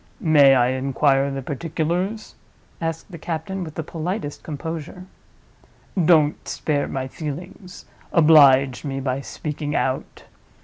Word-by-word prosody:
"May 145 -5 +6
I 125 -1 +3
inquire 135 +1 +1
the 135 -1 -5
particulars?" 170 - -3 0.5
asked 165 +4 -4
the 170 - -9
captain, 175 +4 -4
with 155 -3 -9
the 160 - -3
politest 165 0 -4
composure. 160 +3 -6 1.0
"Don't 155 -3 +3
spare 145 -2 -1
my 130 -1 -4
feelings; 180 +6 -8 0.3
oblige 140 -5 +5
me 135 -2 -3
by 135 0 -2
speaking 150 +1 -5
out. 130 0 -2
150 Hz, 120 wpm, -22 LUFS, 135-165 Hz, 1.0 s, May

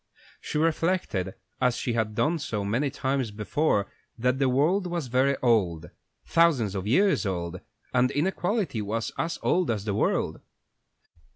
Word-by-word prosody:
She - - -3
reflected, 160 - 0 0.3
as 125 -1 +2
she 120 - -2
had 110 -2 -1
done 160 +7 +1
so 105 -7 -3
many 120 +8 0
times 135 -2 -1
before, 105 +1 0 0.3
that 125 +3 +1
the 135 -2 +3
world 165 +9 +2
was 170 -4 -2
very 130 +3 +2
old 90 -10 +1 0.3
thousands 150 - +3
of 95 0 -3
years 190 - +3
old 90 -2 -3 0.3
and 125 0 +3
inequality 180 - -1
was 110 +2 -2
as 170 +1 -1
old 180 0 +2
as 105 -3 -1
the 105 - -1
world. 105 - 0
125 Hz, 150 wpm, -27 LUFS, 105-160 Hz, 0.3 s, the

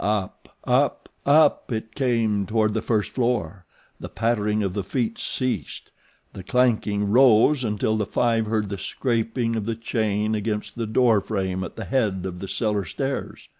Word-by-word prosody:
Up, 105 -2 -3
up, - - +1 0.2
up 150 -1 +4
it 110 -1 -4
came 115 -7 0
toward 110 -1 +1
the 110 - -1
first 110 -3 0
floor. 100 - -2 0.3
The - - -7
pattering 105 -2 0
of 95 -2 -2
the 100 -1 -2
feet 115 +3 -2
ceased. 125 - -3 0.4
The 95 - -8
clanking 105 -2 +1
rose 130 +3 +5
until 110 -1 0
the 105 -2 -1
five 115 0 +1
heard 105 -2 -1
the 100 -1 -5
scraping 115 0 -1
of 110 -2 -2
the 115 0 -2
chain 110 -2 -1
against 105 -1 -3
the 115 -2 -3
door 110 -1 +3
frame 95 -3 -2
at 90 - -7
the - - -6
head 105 -8 0
of 90 -1 -5
the 95 - -6
cellar 105 -1 -1
stairs. 135 - -4
110 Hz, 170 wpm, -24 LUFS, 100-120 Hz, 0.4 s, rose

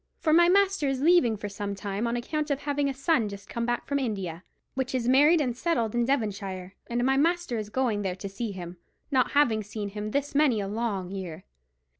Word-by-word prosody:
—for 310 - +1
my 345 +1 +6
master 390 -4 +3
is 270 -1 0
leaving 285 -7 +4
for 205 - -5
some 200 0 -4
time 200 +3 -3
on 235 - -1
account 300 +6 -2
of 285 -1 -1
having 285 -1 0
a - - 0
son 265 -6 +1
just 200 0 -9
come 235 0 -3
home 240 0 +2
from 280 0 0
India, 190 -9 -3 0.3
which 260 0 -2
is 240 -2 -1
married 295 +6 +6
and 250 -5 0
settled 240 -7 0
in 240 0 +1
Devonshire, 200 -7 -2
and 240 0 -1
my 270 +1 +3
master 335 -5 +1
is 210 -1 -5
going 230 -3 0
there 190 -2 -2
to 195 +2 -6
see 205 +3 -4
him, 175 -2 -8 0.3
not 260 -2 +2
having 240 -7 +3
seen 205 0 -5
him 210 +1 -5
this 280 +5 -2
many 280 -6 +3
a 200 - -2
long 200 -4 -2
year.' 185 -3 -6
235 Hz, 220 wpm, -27 LUFS, 200-280 Hz, 0.3 s, my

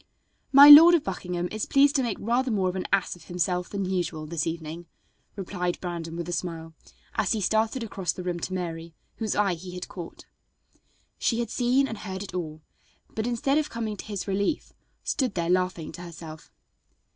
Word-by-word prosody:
"My 280 +1 +10
Lord 325 +4 +11
of 330 - +1
Buckingham 180 -2 -3
is 215 0 -3
pleased 280 +1 +4
to 270 - +3
make 235 -5 -2
rather 245 +4 0
more 195 -5 +1
of 180 - -5
an 185 - -3
ass 195 -2 +1
of 175 - -17
himself 180 0 -1
than 200 -1 -3
usual 175 -4 -2
this 155 0 -2
evening," 165 +1 -6 0.5
replied 180 -2 -3
Brandon 170 -2 -5
with 170 0 -5
a - - -4
smile, 165 -1 -4 0.4
as 220 -1 +1
he 220 - -1
started 220 +5 0
across 195 -5 -3
the 180 - -7
room 175 -1 -3
to 185 - -4
Mary, 165 -2 -5 0.2
whose 220 -3 -2
eye 200 -3 +2
he 180 +2 -8
had 180 - -6
caught. 175 -3 -9 0.9
She 230 - +1
had 235 -2 -3
seen 255 +2 +2
and 225 -4 -6
heard 190 -1 -5
it 195 - -10
all, 155 -3 -5 0.5
but 220 +1 -2
instead 270 +5 +1
of 305 - -2
coming 225 -2 -4
to - - -8
his 205 -2 -5
relief 200 +9 -1 0.3
stood 255 -6 -1
there 170 -1 0
laughing 180 -3 0
to 175 - -10
herself. 165 -2 -10
185 Hz, 195 wpm, -26 LUFS, 175-220 Hz, 0.9 s, Lord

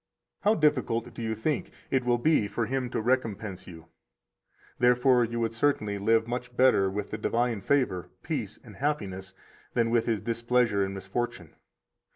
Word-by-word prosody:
How 210 +2 +3
difficult, 130 - +1
do - - -8
you 110 -1 -2
think, 130 +6 -1 0.2
it 130 -1 +2
will 120 0 +2
be 135 -4 +2
for 110 +3 -2
Him 130 +1 -2
to - - -2
recompense 110 -5 -1
you! 80 -2 -11 0.9
Therefore 125 0 +4
you 115 +1 -2
would 115 -1 -1
certainly 115 -5 0
live 110 +2 +3
much 125 0 -5
better 125 -7 +4
with 100 +1 -4
the - - -4
divine 120 -3 0
favor, 125 - 0
peace, - - -3
and - - -13
happiness 95 -10 -3 0.4
than 115 -1 +2
with 120 0 +2
His 115 -3 +1
displeasure 115 -2 +1
and 95 0 -3
misfortune. 95 -2 -4
115 Hz, 165 wpm, -28 LUFS, 105-125 Hz, 0.9 s, Therefore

